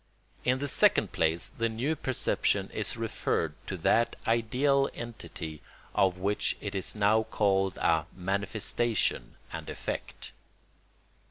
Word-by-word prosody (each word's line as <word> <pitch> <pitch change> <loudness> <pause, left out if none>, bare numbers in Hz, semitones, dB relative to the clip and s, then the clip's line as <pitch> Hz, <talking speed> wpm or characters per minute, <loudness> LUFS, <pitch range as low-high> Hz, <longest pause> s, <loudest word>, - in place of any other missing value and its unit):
In 125 +1 +2
the 145 +2 -2
second - - +5
place 80 +2 +1
the 115 0 0
new 125 +8 -1
perception 130 -4 0
is - - -2
referred 80 -2 -1
to 95 - -3
that 115 +8 +2
ideal 130 +5 +2
entity 90 -9 -7 0.3
of 95 -2 +2
which 100 +3 0
it 100 - -5
is 95 +1 -2
now 105 +1 +4
called 95 -3 +1
a 80 -1 +2
manifestation 100 +4 -1 0.2
and - - -6
effect. - - -5
105 Hz, 120 wpm, -29 LUFS, 95-120 Hz, 0.3 s, second